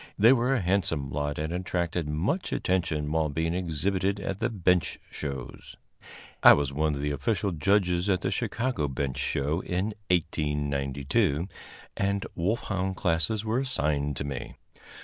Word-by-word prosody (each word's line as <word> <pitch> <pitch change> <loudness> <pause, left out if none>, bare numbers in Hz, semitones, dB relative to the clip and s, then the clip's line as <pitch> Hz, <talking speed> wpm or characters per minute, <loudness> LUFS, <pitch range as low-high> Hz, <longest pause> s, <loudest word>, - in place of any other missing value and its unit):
They 115 +5 +7
were 130 +1 +2
a 120 - +1
handsome 85 -7 0
lot 75 +1 -2
and 80 +2 -2
attracted 90 -3 -2
much 90 - -1
attention 80 -5 0
while 80 -1 +1
being 80 +3 -1
exhibited 95 +3 0
at 95 -1 -3
the - - +1
bench 90 -5 +1
shows. 70 -4 -6 0.7
I - - +10
was 70 -1 0
one 75 +1 +1
of 70 - -4
the 75 0 -1
official 95 +7 0
judges 90 +1 +2
at 95 -2 +2
the - - -1
Chicago 120 - -1
Bench 70 -1 -3
Show 70 +4 0
in 95 +5 -2 0.2
1892, 75 -2 0 0.5
and 100 0 0
wolfhound 95 0 -1
classes 90 +5 0
were 110 +3 +1
assigned 75 - -1
me. 70 -3 -5
85 Hz, 145 wpm, -28 LUFS, 75-95 Hz, 0.7 s, I